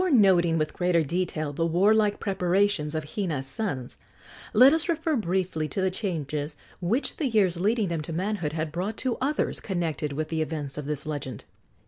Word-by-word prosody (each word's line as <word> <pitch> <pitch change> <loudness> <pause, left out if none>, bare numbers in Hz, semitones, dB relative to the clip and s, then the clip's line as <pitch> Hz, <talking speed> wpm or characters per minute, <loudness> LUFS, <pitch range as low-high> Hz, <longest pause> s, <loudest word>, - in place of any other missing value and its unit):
Before 360 -8 +4
noting 175 -5 +5
with 155 -1 -1
greater 175 -2 +2
detail 155 -2 -2
the 165 - -1
warlike 205 +5 +3
preparations 190 -4 +1
of 155 - -1
Hina's 165 -10 -2
sons, 135 - -4 0.5
let 255 +6 +7
us 320 +2 0
refer 325 -1 +1
briefly 185 - -1
to 150 - -4
the 190 0 +2
changes 155 -6 -3 0.2
which 215 +10 0
the 300 - 0
years 195 -7 +2
leading 210 +1 +1
them 165 -2 -1
to 155 - -6
manhood 175 -2 -2
had 155 -1 -2
brought 185 +7 -3
to 255 -2 -1
others 285 +2 0
connected 165 -6 -2
with 155 +2 -3
the 160 -1 -1
events 150 -3 -3
of 150 -1 -5
this 150 0 -3
legend. 145 -6 -5
175 Hz, 180 wpm, -27 LUFS, 155-205 Hz, 0.5 s, let